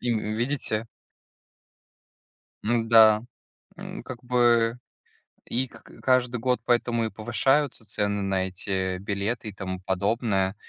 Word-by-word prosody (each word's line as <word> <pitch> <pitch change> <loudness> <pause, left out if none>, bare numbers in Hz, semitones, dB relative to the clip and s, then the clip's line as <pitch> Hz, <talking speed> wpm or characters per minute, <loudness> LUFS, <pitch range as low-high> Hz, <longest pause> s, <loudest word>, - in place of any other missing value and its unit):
И 120 -1 0
в 110 -1 -2
видите? 120 -3 -1 1.8
Ну 115 +1 +1
да, 110 -1 +7 0.5
м, - - -7
как 125 -1 -9
бы 120 -1 +3 0.7
и 130 +2 0
к - - -15 0.2
каждый 125 -1 +2
год 125 0 0
поэтому 120 -1 +1
и 110 - -2
повышаются 120 +5 0
цены 100 -1 -1
на 95 -1 0
эти 95 -1 -2
билеты 105 +3 -3
и - - -10
тому 95 -1 -5
подобное, 95 +1 0
115 Hz, 125 wpm, -26 LUFS, 100-120 Hz, 1.8 s, да